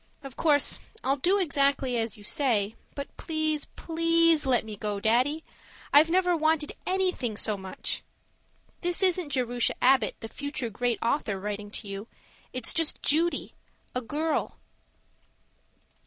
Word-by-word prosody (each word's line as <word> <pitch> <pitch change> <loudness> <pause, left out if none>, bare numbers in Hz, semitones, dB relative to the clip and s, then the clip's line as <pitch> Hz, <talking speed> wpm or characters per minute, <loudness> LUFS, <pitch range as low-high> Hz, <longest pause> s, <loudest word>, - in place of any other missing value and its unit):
Of 270 -2 -9
course 295 -3 +3 0.2
I'll 275 +2 +1
do 360 +9 +3
exactly 280 -6 +1
as 225 -2 -2
you 205 - -14
say, 220 -5 0 0.2
but 280 -1 -6
please, 310 -2 -1
PLEASE 330 -2 +3
let 245 -4 +3
me 215 -1 -6
go, 205 0 -3
Daddy. 255 +9 +2 0.5
I've 300 +3 +7
never 360 0 +3
wanted 315 -1 +1 0.2
anything 365 - 0
so 215 -1 0
much. 190 -1 -3 0.8
This 355 +2 0
isn't 360 -4 +2
Jerusha 245 -3 0
Abbott, 255 -3 +4
the 225 - -5
future 285 -2 -4
great 240 +2 0
author, 230 -5 0
writing 205 +1 -4
to 210 0 -7
you. 200 +2 -6 0.4
It's 255 -2 -1
just 325 -2 0
Judy 330 +4 +2 0.4
a 250 - -1
girl. 300 +6 -2
275 Hz, 140 wpm, -28 LUFS, 225-320 Hz, 0.8 s, I've